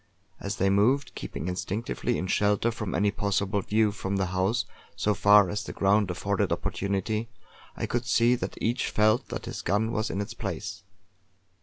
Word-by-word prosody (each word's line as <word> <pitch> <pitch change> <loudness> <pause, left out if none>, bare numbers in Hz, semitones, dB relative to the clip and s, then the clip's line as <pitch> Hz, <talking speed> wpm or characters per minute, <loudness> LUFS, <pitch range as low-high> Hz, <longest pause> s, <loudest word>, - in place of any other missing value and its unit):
As 100 +1 -3
they 95 0 +2
moved, 120 +8 +2
keeping 85 - -6
instinctively 105 +6 -2
in - - -2
shelter 105 +4 +2
from 110 -4 -4
any 100 0 +2
possible 100 0 0
view 110 +2 +2
from 100 -1 -3
the 95 -1 +1
house 95 +7 +1 0.3
so 105 +1 +1
far 105 0 +6
as 105 +3 -3
the - - -7
ground 100 0 +2
afforded 100 +2 -1
opportunity, 100 +3 -1 0.5
I - - -1
could 120 0 -2
see 120 +2 +4
that 125 - -3
each 120 +3 0
felt 110 +4 +2
that - - -5
his - - -5
gun 105 +4 0
was 110 -1 -1
in 95 - -3
its 100 - -4
place. - - -5
105 Hz, 175 wpm, -27 LUFS, 100-110 Hz, 0.5 s, far